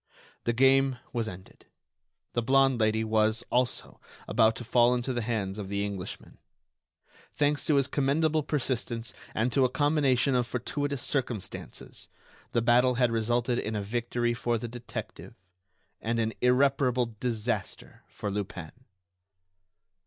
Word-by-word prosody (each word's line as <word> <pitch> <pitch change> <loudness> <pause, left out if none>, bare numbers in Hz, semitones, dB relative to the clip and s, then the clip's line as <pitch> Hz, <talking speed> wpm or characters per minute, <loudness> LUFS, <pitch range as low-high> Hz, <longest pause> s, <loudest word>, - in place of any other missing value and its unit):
The 120 - +2
game 135 +1 +4 0.2
was 115 -2 -1
ended. 95 -2 -11 0.7
The 120 - +1
blonde 135 +1 +3
Lady 110 +1 +2
was, 110 +1 +2
also, 125 0 -1 0.3
about 110 -1 +3
to - - -6
fall 120 +1 +4
into 125 +1 -2
the 120 - -1
hands 105 -3 -2
of 100 - -5
the 100 +1 -1
Englishman. 100 -3 -7 1.0
Thanks 145 0 +1
to 150 - +4
his 140 -1 +4
commendable 150 +3 +1
persistence 120 -6 -2 0.2
and 115 +2 0
to 135 - +4
a 130 - +3
combination 140 -2 +2
of 125 -1 +1
fortuitous 140 +3 -3
circumstances, 120 -9 -4 0.4
the 115 - +1
battle 125 +2 +4
had 125 -1 +2
resulted 120 +2 +1
in 110 - -3
a 105 - -2
victory 120 +2 -1
for 120 0 -1
the 120 - -5
detective, 120 0 -8 0.7
and 115 +1 -1
in 110 0 0
irreparable 125 -2 +2
disaster 115 -4 -3
for 105 - -5
Lupin. 95 -5 -5
120 Hz, 140 wpm, -28 LUFS, 110-130 Hz, 1.0 s, game